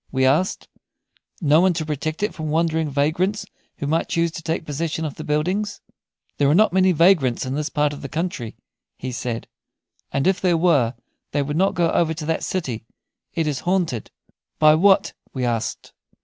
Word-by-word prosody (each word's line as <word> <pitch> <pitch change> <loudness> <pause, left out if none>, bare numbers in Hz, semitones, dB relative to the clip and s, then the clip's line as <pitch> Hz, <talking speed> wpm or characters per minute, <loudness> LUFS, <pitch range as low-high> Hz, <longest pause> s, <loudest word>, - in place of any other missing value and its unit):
we 130 0 +2
asked; 155 +8 +1 0.7
"no 155 0 +5
one 185 0 +4
to 160 -1 -3
protect 155 +4 -3
it 210 - 0
from 155 -1 -5
wandering 160 0 +1
vagrants 160 +9 0 0.3
who 150 - -4
might 160 +3 0
choose 170 0 +1
to 165 - -7
take 160 +1 -2
possession 160 +2 -2
of 150 - -4
the 155 - -8
buildings?" 180 +8 -1 0.6
"There 140 -1 +4
are 150 - +4
not 215 -1 +4
many 190 0 +4
vagrants 165 -8 +3
in 130 - -3
this 150 +2 -2
part 150 -1 +1
of 145 - -9
the 140 - -6
country," 160 -9 -4 0.4
he 130 - -5
said, 120 -1 -4 0.6
"and 135 - 0
if 190 0 +2
there 175 -3 +3
were 145 -9 +3 0.4
they 145 -1 +1
would 145 +1 -3
not 190 +4 +2
go 170 -2 +2
over 160 -1 +1
to 155 -1 -5
that 160 +1 -1
city. 130 -12 -3 0.5
It 165 - +1
is 145 -3 -1
haunted." 175 - -1 0.5
"By 155 0 +6
what?" 190 +5 +4 0.2
we 130 -1 -1
asked. 115 -2 -3
155 Hz, 190 wpm, -22 LUFS, 140-175 Hz, 0.7 s, By